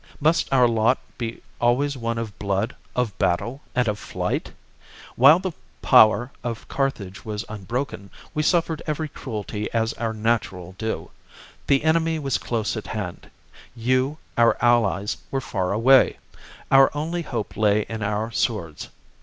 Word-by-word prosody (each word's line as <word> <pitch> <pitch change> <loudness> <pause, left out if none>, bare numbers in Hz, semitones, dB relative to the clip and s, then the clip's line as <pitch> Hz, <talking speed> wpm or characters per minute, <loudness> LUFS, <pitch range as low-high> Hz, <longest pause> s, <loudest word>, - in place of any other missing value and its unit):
Must 160 +3 +2
our 125 -2 +5
lot 115 +2 +3 0.2
be 115 -1 -5 0.2
always 135 +4 +2
one 115 -2 -3
of 110 -3 -5
blood, 100 +2 -1 0.2
of 120 -5 0
battle, 115 +10 0
and 125 -1 +2
of 105 -1 -1
flight? - - -3 0.6
While 140 +6 +8
the 185 0 -3 0.3
power 110 +4 +6
of 115 -2 -5
Carthage 105 -9 -3
was 105 -1 -4
unbroken, 110 0 -4 0.2
we 150 - 0
suffered 165 -1 +1
every 155 +1 -1
cruelty 105 -6 -5
as 115 0 0
our 115 -1 -2
natural 105 -5 -1
due. 110 0 -3 0.6
The 140 0 +3
enemy 160 0 +2
was 140 -4 -1
close 115 -2 -2
at 110 - -6
hand; 100 -5 -5 0.5
you, 130 +5 +1 0.2
our 115 0 +5
allies, 105 -5 +2
were 135 - -1
far 95 -8 -2
away; 125 +6 +5 0.5
our 135 0 +7
only 165 +4 -2
hope 120 -9 -4
lay 105 0 +3
in 110 -1 -5
our 105 +2 -1
swords. 95 -10 -2
115 Hz, 145 wpm, -23 LUFS, 105-135 Hz, 0.6 s, While